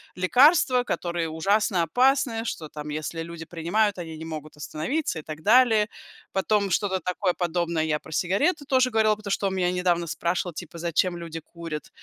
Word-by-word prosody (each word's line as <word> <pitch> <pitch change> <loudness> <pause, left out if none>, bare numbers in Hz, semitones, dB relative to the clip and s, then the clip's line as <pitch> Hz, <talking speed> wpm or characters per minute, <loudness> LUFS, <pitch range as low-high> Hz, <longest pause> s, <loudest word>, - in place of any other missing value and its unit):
лекарства, 250 - +5
которые 170 -7 -2
ужасно 190 +3 +1
опасны, 245 - +2
что 160 -8 -4
там 150 0 -8
если 155 +2 -4
люди 165 0 -7
принимают, 185 +6 0
они 160 -2 -6
не 160 - -7
могут 155 -2 -7
остановиться 160 - -2
и - - -7
так 155 0 -8
далее. 220 0 +5 0.5
Потом 200 +1 +1
что-то 190 +1 0
такое 180 +1 -1
подобное 170 -2 -1
я 155 -1 0
про 160 - -14
сигареты 275 - +1
тоже 260 -2 +3
говорила, 220 -1 +3
потому 205 -1 -7
что 195 0 +1
он 190 - -2
у - - -3
меня 180 -1 +1
недавно 175 -2 0
спрашивал, 175 +2 -1
типа 160 - -8
зачем 170 +2 0
люди 165 -1 -6
курят. 165 -1 -8
180 Hz, 180 wpm, -25 LUFS, 165-215 Hz, 0.5 s, лекарства